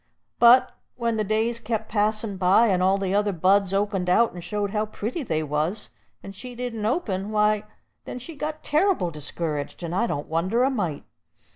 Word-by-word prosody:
But 240 +2 +7 0.2
when 235 -2 -1
the 215 - +1
days 220 +3 0
kep' 220 -1 -3
passin' 215 0 0
by, 195 +5 +4
and 185 -2 +2
all 190 +1 +3
the 195 -1 -2
other 205 0 +2
buds 190 +2 +2
opened 195 -2 0
out, 230 +6 +3
and 175 -1 -8
showed 205 0 -2
how 215 0 -1
pretty 225 +9 -4
they 160 - -1
was, 155 +8 -2 0.3
and 195 - -8
she 245 +5 -9
didn't 230 -3 -3
open, 210 - -1
why, 210 0 +2 0.4
then - - -6
she 305 +6 -9
got 305 +1 -5
terr'ble 305 - +1
discouraged; 150 +1 -4
and 170 0 -4
I 235 +6 +1
don't 145 -7 -3
wonder 185 +10 +1
a 270 - +2
mite. 180 - -2
210 Hz, 185 wpm, -24 LUFS, 185-235 Hz, 0.4 s, But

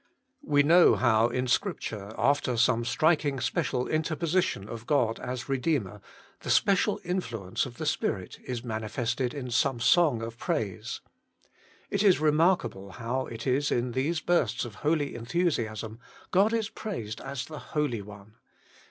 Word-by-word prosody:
We 145 -1 +3
know 170 +4 +6
how 115 -2 +3
in 125 +1 -1
Scripture, 115 - -2
after 140 -4 +1
some 120 0 +3
striking 145 +2 +2
special 125 -1 -1
interposition 155 - 0
of 115 +1 -8
God 125 -7 +2
as 125 -1 -5
Redeemer, 130 - -1 0.4
the - - -7
special 195 -2 +3
influence 120 - -2
of 120 - -12
the 155 - -4
Spirit 95 -10 -2
is 125 -2 -5
manifested 120 +2 -2
in 125 -3 -5
some 130 0 +1
song 125 -1 +4
of 115 +1 -7
praise. 100 -4 -3 0.9
It 200 - +1
is 195 -6 +5
remarkable 150 - +1
how 120 +5 -3
it 115 0 -7
is 135 +3 +1
in 120 +1 0
these 145 +7 0
outbursts 130 -8 +1
of 120 - -8
holy 150 -2 +1
enthusiasm, 115 - -2 0.3
God 195 +4 +4
is 225 -2 0
praised 175 - -6
as 135 -1 -5
the 155 -2 -8
Holy 150 -8 -2
One. 105 +2 -13
130 Hz, 145 wpm, -28 LUFS, 115-155 Hz, 0.9 s, know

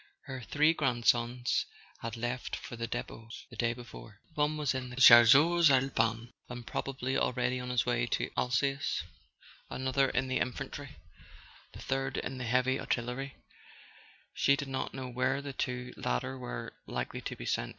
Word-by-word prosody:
Her 130 -2 -7
three 150 +7 +3
grandsons 120 -3 +1 0.3
had 115 0 -5
left 120 +2 -3
for - - -8
their 115 0 -4
depots 115 -1 -7
the - - -10
day 120 +1 +1
before: 115 -3 -12
one 150 0 +1
was 145 -5 0
in 130 -1 -4
the 125 - -8
Chas¬ 120 -3 +9
seurs 165 +3 +5
Alpins, 120 -3 +1 0.2
and 120 -1 -7
probably 135 +2 -3
already 125 +1 0
on 125 0 -5
his 125 -2 +1
way 120 -1 +1
to - - -1
Al¬ 125 - -1
sace, 135 +2 0 0.7
another 130 +1 +1
in 130 +1 0
the 130 - 0
infantry, 135 +2 -4 0.8
the - - -10
third 135 -1 -1
in 130 0 -4
the 125 - -3
heavy 125 +3 +2
artillery; 125 +3 -3 1.0
she 140 - +3
did 140 -1 -5
not 130 -1 -3
know 130 -1 -5
where 125 +2 0
the 140 -1 -6
two 125 -1 -3
latter 60 - -2
were - - -6
likely - - -4
to - - -5
be - - -8
sent. - - -1
125 Hz, 170 wpm, -31 LUFS, 120-135 Hz, 1.0 s, Chas¬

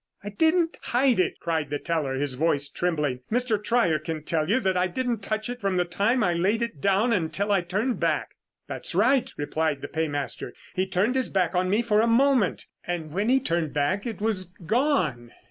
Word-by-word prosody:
"I 205 - -5
didn't 325 - +1
hide 250 -2 +2
it!" 185 - 0
cried 160 -4 -1
the 145 - -1
teller, 150 -4 -2
his 140 0 -2
voice 145 0 0
trembling. 150 -6 -1
"Mr. 230 -3 0
Trier 210 -9 +2
can 155 0 -5
tell 155 0 -1
you 230 +6 +3
that 190 -3 +1
I 180 +1 +2
didn't 240 +4 -2
touch 215 +1 -2
it 245 0 -6
from 195 -2 0
the 180 - +2
time 205 +8 +1
I 175 - +2
laid 200 +7 +1
it 185 -12 -5
down 200 +6 +3
until 195 +2 -1
I 195 -2 +3
turned 210 +8 -1
back." - - 0 0.3
"That's - - -6
right," 245 +6 +3
replied 150 -1 -1
the 145 - -5
paymaster. 145 -3 -3 0.2
"He 185 0 0
turned 190 +6 +1
his 260 -1 0
back 185 -3 +1
on 185 0 +1
me 210 +5 +2
for 215 -2 +3
a 230 - +2
moment, 245 -3 +3 0.2
and 170 -3 -4
when 200 +7 0
he 265 +1 +5
turned 165 - -1
back, 185 +10 0
it 225 - -5
was 210 -4 0 0.2
gone." 180 - 0
190 Hz, 205 wpm, -26 LUFS, 160-230 Hz, 0.3 s, he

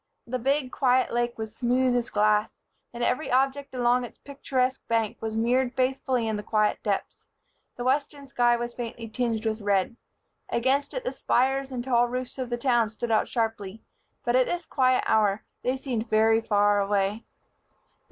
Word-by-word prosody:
The 255 +2 -3
big, 270 +1 0
quiet 255 -1 +2
lake 240 0 -1
was 220 -1 -6
smooth 250 +1 +2
as 245 0 0
glass, 210 0 +2 0.4
and 240 0 -5
every 250 +6 0
object 275 +2 +1
along 245 0 +2
its 240 - -9
picturesque 265 -2 -2
bank 225 -2 -1
was 220 0 -3
mirrored 245 +2 +1
faithfully 260 -2 0
in 220 -1 -1
the - - -4
quiet 215 0 +1
depths. 200 -2 -3 0.5
The 245 - -5
western 280 +2 -1
sky 240 -3 +2
was 240 0 -4
faintly 230 -1 -6
tinged 225 0 -2
with 220 0 -1
red. 200 +1 +1 0.5
Against 270 +4 0
it - - -3
the - - -2
spires 270 +2 +1
and 245 -2 -3
tall 245 -1 +3
roofs 250 +2 -5
of 255 -2 -3
the 240 - -1
town 240 -3 +2
stood 230 +2 -4
out 215 - +2
sharply; 225 -3 -3 0.4
but 240 - +2
at 255 -1 +4
this 350 -1 -3
quiet 255 -3 +2
hour 210 -2 +2 0.2
they 255 +2 0
seemed 240 -4 -3
very 225 +1 +4
far 205 -2 +3
away. 200 +2 0
240 Hz, 175 wpm, -26 LUFS, 220-260 Hz, 0.5 s, at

